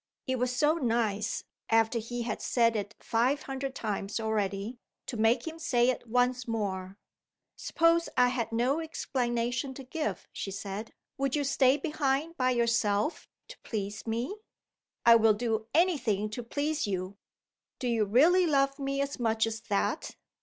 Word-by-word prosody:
It 260 Hz, -2 st, -1 dB
was 250 Hz, 0 st, +1 dB
so 300 Hz, +5 st, +3 dB
nice 230 Hz, -5 st, 0 dB, 0.3 s
(after 225 Hz, +1 st, +3 dB
he 240 Hz, +2 st, -4 dB
had 230 Hz, -2 st, -3 dB
said 230 Hz, -2 st, +2 dB
it 205 Hz, 0 st, -3 dB
five 245 Hz, +5 st, +1 dB
hundred 270 Hz, 0 st, -4 dB
times 210 Hz, -2 st, -3 dB
already) 215 Hz, +1 st, -2 dB, 0.3 s
to -, -, -5 dB
make 230 Hz, +2 st, +2 dB
him 325 Hz, 0 st, -6 dB
say 245 Hz, -5 st, +3 dB
it 245 Hz, -, -7 dB
once 250 Hz, +1 st, +1 dB
more! 195 Hz, -4 st, -3 dB, 0.6 s
"Suppose 335 Hz, 0 st, +2 dB
I 250 Hz, 0 st, +5 dB
had 235 Hz, -3 st, -2 dB
no 245 Hz, +6 st, +1 dB
explanation 245 Hz, -4 st, -2 dB
to 270 Hz, -, -8 dB
give?" 305 Hz, +4 st, -4 dB
she -, -, -4 dB
said. 200 Hz, +2 st, -6 dB, 0.2 s
"Would 275 Hz, 0 st, +1 dB
you 290 Hz, -, +1 dB
stay 275 Hz, 0 st, +3 dB
behind 300 Hz, +1 st, -1 dB
by 255 Hz, -3 st, +1 dB
yourself 235 Hz, +1 st, +1 dB, 0.2 s
to -, -, -11 dB
please 205 Hz, 0 st, -5 dB
me?" 235 Hz, -, -1 dB, 0.7 s
"I 235 Hz, -, +9 dB
would 220 Hz, -2 st, +4 dB
do 225 Hz, -1 st, -1 dB
any 340 Hz, -1 st, +3 dB
thing 215 Hz, -3 st, -1 dB
to 245 Hz, -, -4 dB
please 290 Hz, +3 st, -1 dB
you!" 190 Hz, 0 st, -3 dB, 0.6 s
"Do 250 Hz, -, -3 dB
you 230 Hz, -3 st, +2 dB
really 330 Hz, -, +5 dB
love 275 Hz, -2 st, +2 dB
me 275 Hz, 0 st, -1 dB
as 280 Hz, -1 st, -3 dB
much 225 Hz, -2 st, +2 dB
as 225 Hz, 0 st, -3 dB
that?" 205 Hz, -3 st, -1 dB
240 Hz, 160 wpm, -29 LUFS, 220-275 Hz, 0.7 s, I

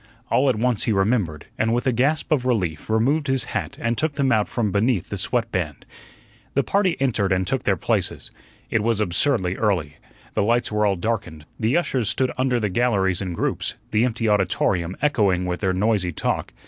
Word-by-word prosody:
All 135 Hz, +1 st, +3 dB
at 130 Hz, -, +2 dB
once 120 Hz, 0 st, 0 dB
he -, -, +1 dB
remembered, 95 Hz, -7 st, 0 dB
and 115 Hz, +1 st, +2 dB
with 120 Hz, -, -1 dB
a 130 Hz, -, +3 dB
gasp 140 Hz, +8 st, 0 dB
of 145 Hz, -5 st, +2 dB
relief 90 Hz, -11 st, -1 dB
removed 135 Hz, +8 st, +1 dB
his 130 Hz, -2 st, +2 dB
hat 110 Hz, -10 st, -4 dB
and 115 Hz, +1 st, 0 dB
took 150 Hz, +3 st, -1 dB
them 140 Hz, -2 st, +1 dB
out 110 Hz, -3 st, +2 dB
from 110 Hz, -5 st, -1 dB
beneath 105 Hz, -1 st, +1 dB
the -, -, -3 dB
sweatband. 95 Hz, -, -2 dB, 0.7 s
The 140 Hz, -, +3 dB
party 195 Hz, -3 st, +1 dB
entered 110 Hz, -7 st, +1 dB
and 95 Hz, 0 st, +1 dB
took -, -, -2 dB
their -, -, +2 dB
places. -, -, -1 dB, 0.4 s
It 115 Hz, -, +2 dB
was 115 Hz, 0 st, +1 dB
absurdly 95 Hz, 0 st, +1 dB
early. 85 Hz, -9 st, 0 dB, 0.4 s
The -, -, +1 dB
lights 120 Hz, +3 st, +1 dB
were 105 Hz, 0 st, +2 dB
all 100 Hz, -, +1 dB
darkened, 85 Hz, -6 st, -3 dB
the 115 Hz, +7 st, +2 dB
ushers 130 Hz, -, 0 dB
stood 130 Hz, 0 st, 0 dB
under 130 Hz, -1 st, +1 dB
the 105 Hz, -, 0 dB
galleries 100 Hz, -4 st, +1 dB
in 90 Hz, -3 st, -3 dB
groups, -, -, -2 dB, 0.2 s
the 110 Hz, +2 st, +3 dB
empty 115 Hz, -2 st, 0 dB
auditorium 95 Hz, -3 st, +1 dB
echoing 100 Hz, -11 st, +2 dB
with 90 Hz, -1 st, -2 dB
their 95 Hz, -2 st, +1 dB
noisy 95 Hz, -1 st, +1 dB
talk. -, -, -2 dB
110 Hz, 195 wpm, -23 LUFS, 95-125 Hz, 0.7 s, All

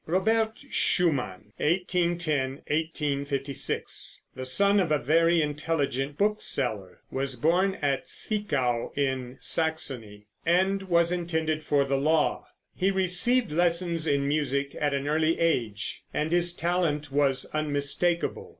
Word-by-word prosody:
Robert 220 Hz, +6 st, +1 dB
Schumann 105 Hz, -, +1 dB
(1810 170 Hz, -5 st, 0 dB
1856), 145 Hz, -3 st, -2 dB
the 130 Hz, 0 st, -5 dB
son 200 Hz, +9 st, +4 dB
of 175 Hz, -5 st, 0 dB
a 150 Hz, -, +4 dB
very 165 Hz, +2 st, +3 dB
intelligent 145 Hz, -2 st, -2 dB
book 210 Hz, +1 st, +1 dB
seller, 110 Hz, -9 st, -3 dB
was 135 Hz, 0 st, -2 dB
born 175 Hz, +9 st, +2 dB
at 140 Hz, -2 st, 0 dB
Zwickau, 140 Hz, -, -1 dB
in 130 Hz, -2 st, -2 dB
Saxony, 130 Hz, -10 st, -2 dB, 0.2 s
and 190 Hz, +4 st, +2 dB
was 170 Hz, -2 st, +2 dB
intended 160 Hz, -3 st, -1 dB
for 145 Hz, -2 st, +2 dB
the 135 Hz, 0 st, 0 dB
law. 155 Hz, +3 st, +1 dB, 0.3 s
He 190 Hz, -, +1 dB
received 190 Hz, +5 st, +2 dB
lessons 170 Hz, 0 st, +1 dB
in 140 Hz, -1 st, +1 dB
music 140 Hz, -1 st, -1 dB
at 145 Hz, -1 st, +1 dB
an 140 Hz, +1 st, -3 dB
early 155 Hz, +2 st, +1 dB
age, 115 Hz, -11 st, -1 dB
and 155 Hz, +2 st, -2 dB
his 175 Hz, 0 st, +1 dB
talent 165 Hz, -5 st, -1 dB
was 140 Hz, -2 st, +2 dB
unmistakable. 155 Hz, +3 st, 0 dB
155 Hz, 125 wpm, -27 LUFS, 140-175 Hz, 0.3 s, son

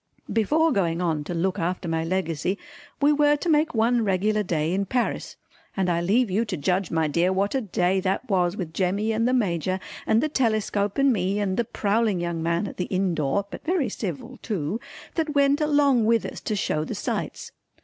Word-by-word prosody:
Before 310 Hz, +9 st, +3 dB
going 170 Hz, -7 st, 0 dB
on 160 Hz, -4 st, 0 dB
to 175 Hz, -, -4 dB
look 185 Hz, +3 st, 0 dB
after 180 Hz, +1 st, -2 dB
my 165 Hz, 0 st, 0 dB
Legacy 180 Hz, +1 st, -1 dB, 0.4 s
we 290 Hz, +1 st, +4 dB
were 295 Hz, 0 st, +4 dB
to 295 Hz, -, -5 dB
make 305 Hz, -3 st, +2 dB
one 230 Hz, +1 st, +3 dB
regular 210 Hz, +2 st, +1 dB
day 165 Hz, -4 st, -1 dB
in 195 Hz, +1 st, -1 dB
Paris, 245 Hz, +3 st, -1 dB, 0.4 s
and 185 Hz, -2 st, +1 dB
I 170 Hz, 0 st, +1 dB
leave 210 Hz, +5 st, +2 dB
you 210 Hz, +5 st, +2 dB
to 205 Hz, -5 st, -4 dB
judge 180 Hz, +5 st, 0 dB
my 160 Hz, -1 st, +1 dB
dear 170 Hz, +5 st, +2 dB
what 195 Hz, +2 st, 0 dB
a 270 Hz, -, +1 dB
day 190 Hz, -3 st, +1 dB
that 190 Hz, +7 st, -1 dB
was 185 Hz, -2 st, +1 dB
with 170 Hz, -6 st, -5 dB
Jemmy 200 Hz, +5 st, 0 dB
and 225 Hz, +2 st, +1 dB
the 255 Hz, -, +2 dB
Major 185 Hz, -, 0 dB, 0.3 s
and 220 Hz, -, +4 dB
the 310 Hz, -, +1 dB
telescope 215 Hz, -7 st, 0 dB
and 275 Hz, -1 st, +4 dB
me 195 Hz, -1 st, 0 dB
and 195 Hz, -2 st, 0 dB
the 235 Hz, -, 0 dB
prowling 215 Hz, -2 st, 0 dB
young 170 Hz, -1 st, -2 dB
man 170 Hz, +4 st, 0 dB
at -, -, -9 dB
the 180 Hz, -, -1 dB
inn 185 Hz, -1 st, 0 dB
door 155 Hz, +6 st, 0 dB
(but -, -, -8 dB
very 330 Hz, -7 st, 0 dB
civil 215 Hz, -, -6 dB
too) 200 Hz, -, -2 dB, 0.3 s
that 315 Hz, -3 st, -2 dB
went 280 Hz, +1 st, +3 dB
along 285 Hz, -6 st, +3 dB
with 230 Hz, +1 st, +2 dB
us -, -, -6 dB
to 215 Hz, -, -2 dB
show 155 Hz, -6 st, -1 dB
the -, -, -5 dB
sights. -, -, -4 dB
200 Hz, 210 wpm, -25 LUFS, 175-235 Hz, 0.4 s, we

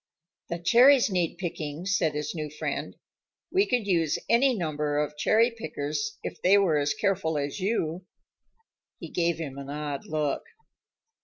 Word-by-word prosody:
"The 170 Hz, -, -2 dB
cherries 240 Hz, +7 st, +5 dB
need 175 Hz, -3 st, 0 dB
picking," 160 Hz, -2 st, -5 dB
said 175 Hz, -6 st, +1 dB
his 150 Hz, 0 st, -3 dB
new 155 Hz, -3 st, -4 dB
friend. 150 Hz, -, -4 dB, 0.6 s
"We 390 Hz, +2 st, +3 dB
could 245 Hz, -4 st, 0 dB
use 165 Hz, -6 st, +1 dB
any 255 Hz, +2 st, +4 dB
number 150 Hz, -4 st, -1 dB
of 150 Hz, 0 st, -1 dB
cherry 220 Hz, +10 st, +3 dB
pickers, 155 Hz, 0 st, -4 dB
if -, -, -6 dB
they 195 Hz, +3 st, +5 dB
were 175 Hz, -7 st, +3 dB
as 145 Hz, 0 st, 0 dB
careful 185 Hz, -6 st, 0 dB
as 145 Hz, +5 st, -3 dB
you." 185 Hz, -3 st, -2 dB, 0.9 s
He -, -, -8 dB
gave 170 Hz, -1 st, +1 dB
him 140 Hz, -4 st, -6 dB
an 140 Hz, 0 st, -8 dB
odd 145 Hz, -1 st, -4 dB
look. 155 Hz, -2 st, -1 dB
165 Hz, 155 wpm, -27 LUFS, 150-200 Hz, 0.9 s, cherries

